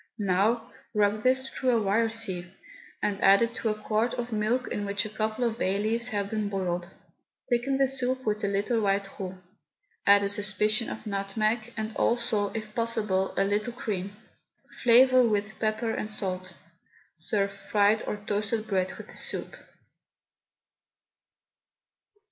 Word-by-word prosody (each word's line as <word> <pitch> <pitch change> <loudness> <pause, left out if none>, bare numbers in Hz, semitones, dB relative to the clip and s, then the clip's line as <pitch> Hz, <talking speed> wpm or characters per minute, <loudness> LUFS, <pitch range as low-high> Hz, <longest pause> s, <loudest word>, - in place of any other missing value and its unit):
Now 215 +4 +1 0.2
rub 210 0 +2
this 260 +2 +2
through 260 -1 -2
a 235 -2 +4
wire 220 +3 +2
sieve 190 -5 -1 0.5
and 200 -1 -1
add 195 +3 +7
it 230 0 -1
to 225 - -1
a 215 - 0
quart 220 +2 0
of 240 0 -4
milk 220 +4 0
in 205 - -3
which 200 +1 -1
a - - -5
couple 215 +2 -1
of 230 0 -4
bay 190 +1 +1
leaves 225 +3 0
have 205 -4 -2
been 215 -2 -1
boiled. 180 -3 -2 0.6
Thicken 245 +3 +1
the 270 0 +3
soup 260 -1 -1
with 210 -1 -1
a - - +2
little 205 +4 0
white 200 -1 +1
roux, 190 -1 -5 0.7
add 200 0 +7
a 200 - 0
suspicion 210 +3 +1
of 220 - -7
nutmeg, 215 +3 -1
and 220 0 -4
also, 235 -4 +1
if 215 -1 -6
possible, 215 -5 +2
a 195 - +4
little 210 +4 -1
cream. 200 -4 -4 0.7
Flavour 255 +1 +6
with 215 -2 0
pepper 220 +1 0
and 215 - -3
salt. 185 -3 -3 0.6
Serve 200 +4 -1
fried 205 +2 +2
or 210 - -2
toasted 215 +1 -1
bread 190 -2 0
with - - -10
the - - -11
soup. - - -5
215 Hz, 155 wpm, -27 LUFS, 200-230 Hz, 0.7 s, add